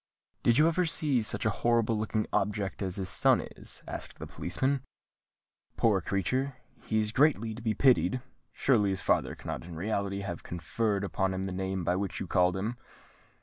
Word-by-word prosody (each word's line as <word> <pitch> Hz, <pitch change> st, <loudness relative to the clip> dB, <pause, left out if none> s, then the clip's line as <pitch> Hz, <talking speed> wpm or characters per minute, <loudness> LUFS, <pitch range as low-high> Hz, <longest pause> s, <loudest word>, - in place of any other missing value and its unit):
"Did 120 Hz, 0 st, +4 dB
you 155 Hz, -, +6 dB
ever 170 Hz, +2 st, +2 dB
see 150 Hz, -6 st, +1 dB
such 110 Hz, 0 st, -2 dB
a 110 Hz, -, +3 dB
horrible 115 Hz, -1 st, +3 dB
looking 110 Hz, 0 st, -1 dB
object 100 Hz, -1 st, -1 dB
as 95 Hz, -2 st, -1 dB
his 95 Hz, -2 st, -2 dB
son 90 Hz, -, +4 dB, 0.2 s
is?" -, -, -8 dB
asked -, -, -7 dB
the -, -, -6 dB
policeman. 130 Hz, +10 st, -1 dB, 1.0 s
"Poor 105 Hz, -5 st, +3 dB
creature—he 120 Hz, +5 st, -2 dB
is 105 Hz, -1 st, +1 dB
greatly 125 Hz, -4 st, +3 dB
to 115 Hz, -, -9 dB
be 110 Hz, -2 st, 0 dB
pitied! 130 Hz, -4 st, +4 dB, 0.3 s
Surely 110 Hz, -7 st, +3 dB
his 95 Hz, -2 st, -2 dB
father -, -, +1 dB
cannot -, -, -5 dB
in 85 Hz, 0 st, -9 dB
reality 100 Hz, +2 st, -2 dB
have 85 Hz, -4 st, -5 dB
conferred 100 Hz, +5 st, -1 dB
upon 95 Hz, -1 st, 0 dB
him 95 Hz, +1 st, -2 dB
the 95 Hz, -, -3 dB
name 95 Hz, 0 st, -2 dB
by 90 Hz, +2 st, +1 dB
which 95 Hz, -4 st, -2 dB
you -, -, -3 dB
called 90 Hz, +1 st, +2 dB
him?" 110 Hz, +5 st, -3 dB
105 Hz, 180 wpm, -30 LUFS, 95-120 Hz, 1.0 s, you